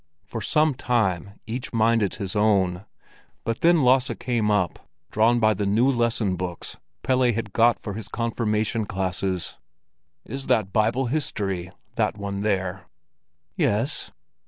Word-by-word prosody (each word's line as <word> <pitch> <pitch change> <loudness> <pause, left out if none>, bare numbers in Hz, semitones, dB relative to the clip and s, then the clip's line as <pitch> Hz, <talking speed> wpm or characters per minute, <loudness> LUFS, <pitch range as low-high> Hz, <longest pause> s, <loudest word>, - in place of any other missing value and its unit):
For 115 +2 -6
some 155 +7 +2
time 100 -7 -1
each 120 +3 -5
minded 115 -3 +2
his 95 -1 -4
own; 100 -3 +2 0.6
but 115 0 -3
then 170 -3 +5
Lasse 130 0 +4
came 115 -4 0
up, 95 -5 0 0.2
drawn 115 +3 +3
by 110 -1 +4
the 100 0 -2
new 110 +6 +3
lesson 115 -5 +1
books 90 -1 -5 0.2
Pelle 130 -1 +3
had 110 -3 -4
got 120 +1 +4
for 105 - -6
his 105 0 -6
confirmation 110 -1 -1
classes. 95 -1 -2 0.7
"Is 135 0 -6
that 110 -6 +1
Bible 115 +5 +2
history, 100 - -2 0.3
that 110 -1 +1
one 100 -1 -4
there?" 95 -3 -1 0.7
"Yes." 115 +9 0
110 Hz, 135 wpm, -24 LUFS, 100-120 Hz, 0.7 s, then